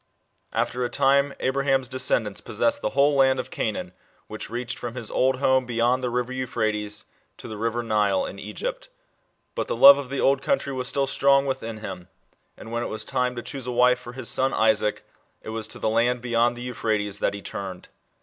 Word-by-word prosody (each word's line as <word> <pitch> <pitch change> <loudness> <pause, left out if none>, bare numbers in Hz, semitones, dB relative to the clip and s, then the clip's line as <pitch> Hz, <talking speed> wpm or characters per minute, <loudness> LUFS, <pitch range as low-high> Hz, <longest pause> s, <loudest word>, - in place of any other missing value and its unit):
After 125 0 -1
a 120 - -1
time 140 +2 +2
Abraham's 135 0 +1
descendants 125 -5 -1
possessed 285 0 0
the - - 0
whole 145 +1 +5
land 130 -1 +4
of - - -5
Canaan, - - -3 0.3
which 110 - -7
reached 120 +1 -4
from 120 0 -5
his 115 -4 -5
old 130 +1 +2
home 130 -1 +2
beyond 120 +2 +1
the 125 - 0
river 125 +1 -2
Euphrates 110 -5 -2 0.3
to - - -10
the 110 - -6
river 115 +2 -2
Nile 105 -4 +1
in 100 - -7
Egypt. - - -5 0.6
But - - -3
the - - -1
lote 280 +1 +9
of 135 - -6
the* 140 0 -3
old 135 0 +3
country 140 - 0
was 130 -1 -3
still 140 +1 +1
strong 140 0 +3
within 115 -5 -3
him; 95 -4 -7 0.5
and 110 - -10
when 120 0 -1
it - - -2
was 110 - -4
time 125 0 -1
to 120 - -5
choose 135 -3 -7
a - - -1
wife 125 +1 +4
for 120 - -10
his 130 -2 -5
son 135 +1 +1
Isaac, 110 -1 +2 0.4
it - - -7
was 110 0 -3
to - - -4
the - - -2
land 120 +3 +2
beyond 120 0 +1
the 120 - -7
Euphrates 110 -4 -2
that - - 0
he 100 - -8
turned. 95 -2 -7
125 Hz, 205 wpm, -25 LUFS, 110-135 Hz, 0.6 s, lote